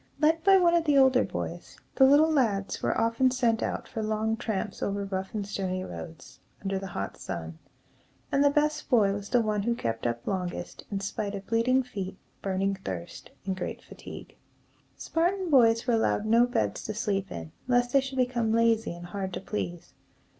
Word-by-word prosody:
Led 320 Hz, +1 st, +3 dB
by 390 Hz, +1 st, +7 dB
one 345 Hz, -2 st, +4 dB
of 340 Hz, -1 st, +3 dB
the 295 Hz, -2 st, +4 dB
older 265 Hz, -1 st, +5 dB
boys, -, -, -6 dB, 0.2 s
the 265 Hz, -, +6 dB
little 295 Hz, +4 st, +6 dB
lads 210 Hz, -9 st, 0 dB
were -, -, 0 dB
often 230 Hz, +3 st, +3 dB
sent 240 Hz, -3 st, +1 dB
out -, -, -3 dB
for 225 Hz, -, -4 dB
long 220 Hz, +1 st, 0 dB
tramps 220 Hz, -3 st, -3 dB
over 200 Hz, 0 st, -1 dB
rough 190 Hz, +1 st, -4 dB
and 205 Hz, -2 st, -2 dB
stony 185 Hz, -2 st, -3 dB
roads, 165 Hz, -5 st, -9 dB, 0.2 s
under 195 Hz, -1 st, -1 dB
the 195 Hz, -, -6 dB
hot 100 Hz, -, -5 dB
sun; 80 Hz, -3 st, -6 dB, 0.7 s
and 275 Hz, -, +3 dB
the 285 Hz, -, +6 dB
best 300 Hz, +1 st, 0 dB
boy 210 Hz, -6 st, +4 dB
was 205 Hz, 0 st, -6 dB
the 245 Hz, -, +4 dB
one 210 Hz, -1 st, 0 dB
who 235 Hz, +3 st, 0 dB
kept 115 Hz, -, -2 dB
up 120 Hz, 0 st, -3 dB
longest, 180 Hz, -3 st, -4 dB
in 195 Hz, -1 st, -3 dB
spite 200 Hz, +1 st, -3 dB
of 195 Hz, 0 st, -7 dB
bleeding 240 Hz, +4 st, +2 dB
feet, 195 Hz, -6 st, -6 dB, 0.2 s
burning 195 Hz, 0 st, 0 dB
thirst, 85 Hz, -2 st, -6 dB, 0.2 s
and 190 Hz, -1 st, -1 dB
great 185 Hz, -, -5 dB
fatigue. -, -, -11 dB, 0.6 s
Spartan 355 Hz, +2 st, 0 dB
boys 230 Hz, -4 st, +5 dB
were 245 Hz, -, +2 dB
allowed 220 Hz, -2 st, +1 dB
no 230 Hz, +2 st, +5 dB
beds 245 Hz, -2 st, -1 dB
to 215 Hz, -, -4 dB
sleep 200 Hz, -3 st, -1 dB
in, 80 Hz, -2 st, -7 dB, 0.2 s
lest 245 Hz, -1 st, +2 dB
they 275 Hz, -, +6 dB
should 265 Hz, 0 st, -6 dB
become 245 Hz, -3 st, +1 dB
lazy 225 Hz, -3 st, +2 dB
and 175 Hz, 0 st, -9 dB
hard 190 Hz, +1 st, -4 dB
to -, -, -3 dB
please. 95 Hz, -, -5 dB
220 Hz, 190 wpm, -28 LUFS, 195-255 Hz, 0.7 s, by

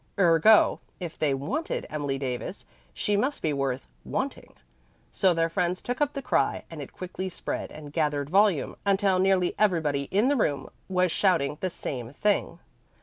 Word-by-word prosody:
Ergo, 180 Hz, +3 st, +5 dB, 0.2 s
if 175 Hz, -3 st, -6 dB
they 150 Hz, -2 st, +2 dB
"wanted" 220 Hz, -, -3 dB
Emily 145 Hz, -3 st, -2 dB
Davis, 135 Hz, +7 st, -4 dB, 0.3 s
she 205 Hz, -, 0 dB
must 265 Hz, +8 st, 0 dB
be 155 Hz, -, +1 dB
worth 135 Hz, -2 st, -2 dB, 0.2 s
"wanting." 270 Hz, +1 st, -4 dB, 0.6 s
So 190 Hz, -2 st, +3 dB
their 165 Hz, -1 st, +2 dB
friends 175 Hz, +1 st, -1 dB
took 245 Hz, +3 st, -4 dB
up 290 Hz, 0 st, +2 dB
the 275 Hz, -, -5 dB
cry, -, -, +1 dB
and 160 Hz, -3 st, -7 dB
it 140 Hz, -, -8 dB
quickly 185 Hz, +1 st, -5 dB
spread -, -, -4 dB
and 150 Hz, -1 st, -10 dB
gathered 150 Hz, -3 st, 0 dB
volume, 195 Hz, -5 st, +3 dB
until 195 Hz, -2 st, +2 dB
nearly 185 Hz, -1 st, +3 dB
everybody 155 Hz, -9 st, +1 dB
in 205 Hz, +6 st, +3 dB
the 285 Hz, -, +3 dB
room 145 Hz, -, 0 dB, 0.2 s
was 185 Hz, -2 st, +2 dB
shouting 160 Hz, -7 st, +1 dB
the 185 Hz, -, 0 dB
same 125 Hz, -7 st, -6 dB
thing. 210 Hz, +7 st, 0 dB
175 Hz, 165 wpm, -27 LUFS, 145-200 Hz, 0.6 s, Ergo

